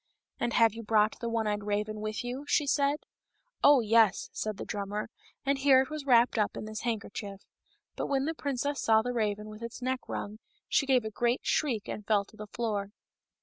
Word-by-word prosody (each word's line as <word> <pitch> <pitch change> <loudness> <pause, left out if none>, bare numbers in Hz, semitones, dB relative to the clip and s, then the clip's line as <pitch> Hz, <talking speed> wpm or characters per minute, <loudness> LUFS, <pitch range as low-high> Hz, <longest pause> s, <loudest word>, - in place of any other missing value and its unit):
" - - -49
And 240 - -1
have 230 -2 +5
you 230 - -7
brought 215 -1 +2
the 235 - -3
one 230 -1 0
eyed 210 -1 -1
raven 210 +1 -2
with 215 +2 -3
you 250 +3 -4
?" - - -29
she 300 - +3
said. 280 0 +2
*^ - - -9 0.7
Oh, 285 -3 +7
yes," 225 -3 +3
said 215 -2 -3
the - - -6
drummer, 205 +1 -4 0.3
and 275 0 +1
here 270 -1 +6
it 265 - -11
was 305 -2 -5
wrapped 240 -2 +5
up 210 - 0
in - - -5
this 215 0 -6
handkerchief. 205 -3 -4 0.5
But - - -3
when 275 -1 +1
the 320 - -1
princess 285 -1 -2
saw 220 -1 +4
the 245 +1 -2
raven 210 -2 -1
with 215 +1 -10
its 235 +1 -6
neck 255 +1 -1
wrung, 210 +1 -5 0.3
she 275 - +2
gave 255 -4 +3
a 220 - -4
great 240 +3 0
shriek 245 -9 0
and 210 - -5
fell 205 -1 +2
to 215 - -19
the 215 0 -8
floor. 205 -3 -2
225 Hz, 225 wpm, -30 LUFS, 210-260 Hz, 0.7 s, Oh